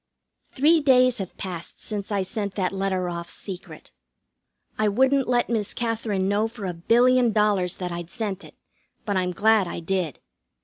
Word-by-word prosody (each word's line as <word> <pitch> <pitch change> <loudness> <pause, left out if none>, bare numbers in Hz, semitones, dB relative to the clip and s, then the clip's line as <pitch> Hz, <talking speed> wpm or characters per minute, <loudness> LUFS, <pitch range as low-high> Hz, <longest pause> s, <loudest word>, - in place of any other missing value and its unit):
Three 310 +5 +4
days 255 -4 +4
have 190 -2 -6
passed 175 -3 -6
since 210 -1 -5
I 200 -2 +1
sent 200 0 -4
that 185 -2 0
letter 190 -2 -1
off 170 -1 -5
secret. 185 -5 -8 0.8
I 215 - +1
wouldn't 265 +5 +2
let 245 -1 +2
Miss 220 -4 -1
Katherine 220 -5 -1
know 205 +2 +1
for 225 -3 -8
a 180 - -2
billion 240 +7 +3
dollars 205 -4 +2
that 180 -1 -4
I'd 170 -1 -6
sent 210 -4 -4
it, - - -14 0.5
but 205 - -1
I'm 180 -1 0
glad 210 +1 +3
I 170 - -5
did. 170 -4 -2
200 Hz, 170 wpm, -24 LUFS, 185-230 Hz, 0.8 s, Three